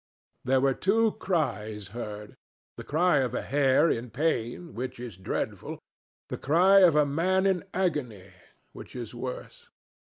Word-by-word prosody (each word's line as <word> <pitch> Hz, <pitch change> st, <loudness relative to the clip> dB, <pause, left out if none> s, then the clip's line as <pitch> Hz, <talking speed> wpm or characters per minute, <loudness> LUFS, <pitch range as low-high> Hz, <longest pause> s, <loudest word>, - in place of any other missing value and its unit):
There 130 Hz, +1 st, +2 dB
were 135 Hz, 0 st, +2 dB
two 220 Hz, -, +2 dB
cries 110 Hz, -, -2 dB
heard, 105 Hz, -1 st, -7 dB, 0.4 s
the -, -, -8 dB
cry 170 Hz, +1 st, +2 dB
of 125 Hz, -3 st, 0 dB
a -, -, -2 dB
hare 140 Hz, +2 st, +3 dB
in 120 Hz, -5 st, -1 dB
pain, 145 Hz, +3 st, -2 dB
which 125 Hz, 0 st, -5 dB
is 120 Hz, -5 st, -7 dB
dreadful, 95 Hz, -, -4 dB, 0.5 s
the -, -, -5 dB
cry 180 Hz, +7 st, +5 dB
of 175 Hz, -5 st, +6 dB
a 150 Hz, -1 st, +5 dB
man 180 Hz, +7 st, +1 dB
in 190 Hz, -3 st, +1 dB
agony, 130 Hz, -, -2 dB, 0.4 s
which -, -, -11 dB
is 120 Hz, -2 st, -6 dB
worse. 125 Hz, +1 st, -7 dB
135 Hz, 150 wpm, -27 LUFS, 120-175 Hz, 0.5 s, of